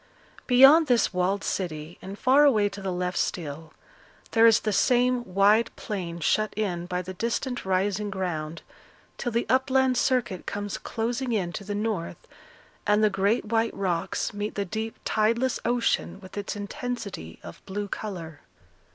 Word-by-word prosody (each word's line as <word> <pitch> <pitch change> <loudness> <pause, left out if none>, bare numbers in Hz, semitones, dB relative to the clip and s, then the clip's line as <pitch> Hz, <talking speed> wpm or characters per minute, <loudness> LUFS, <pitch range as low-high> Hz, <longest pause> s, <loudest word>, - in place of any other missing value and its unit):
Beyond 270 +6 +7
this 240 -6 +2
walled 185 +2 0
city, 160 -3 -4
and 195 +1 -8
far 265 +5 +5
away 215 -8 +4
to 200 - -9
the 190 -1 -2
left 180 0 -2
still, 155 -1 -3 0.6
there 230 0 +6
is 225 - +5
the 215 - -1
same 250 +2 +3
wide 210 +4 +5
plain 175 -5 -5
shut 215 +6 +1
in 180 -5 -2
by 180 0 -2
the 185 +1 -7
distant 235 +5 -2
rising 195 +2 0
ground, 170 -5 -4 0.6
till 245 - -2
the 235 +1 0
upland 260 -1 +2
circuit 240 -9 0
comes 205 0 -4
closing 240 +2 -2
in 180 -5 -1
to 200 - -5
the 205 +1 -4
north, 210 -5 -3 0.6
and 210 +1 +4
the 210 - +4
great 200 +5 +1
white 225 +1 0
rocks 180 +1 -1
meet 205 +1 -4
the 200 - -1
deep 220 +4 -4
tideless 230 +3 +1
ocean 235 -4 0
with 185 -2 -13
its 205 0 -4
intensity 205 - -5
of 85 - -11
blue 205 +1 -3
colour. 170 -8 -6
205 Hz, 160 wpm, -26 LUFS, 185-235 Hz, 0.6 s, Beyond